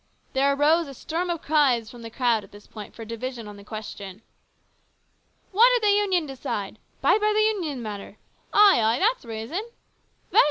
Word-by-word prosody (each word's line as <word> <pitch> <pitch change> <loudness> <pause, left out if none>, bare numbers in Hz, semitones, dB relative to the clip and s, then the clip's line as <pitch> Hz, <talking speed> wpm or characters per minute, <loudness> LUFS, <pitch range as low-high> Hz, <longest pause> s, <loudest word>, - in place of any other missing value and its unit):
There 275 +1 +3
arose 305 +4 +3
a 275 - -9
storm 340 +7 -3
of 340 -2 -3
cries 265 -7 +2
from 240 - -12
the 230 - -7
crowd 235 -2 +1
at - - -16
this 205 0 -14
point 210 -2 -10
for 230 - -8
a - - -9
division 230 0 -6
on 205 - -9
the 200 - -13
question. 210 -1 -8 0.6
" - - -42
What 450 +6 +6
did 475 - 0
the 405 - +5
Union 380 -5 +1
decide? 220 -7 -5 0.2
Bide 430 - +3
by 425 0 +3
the - - +3
Union 405 -8 0
in - - -7
the 240 - -6
matter! 205 -1 -7 0.3
Ay, 405 - +6
ay, 225 +2 +2
that's 445 - +1
reason! 230 - -4 0.7
Vote! - - +5
260 Hz, 205 wpm, -25 LUFS, 220-345 Hz, 0.7 s, What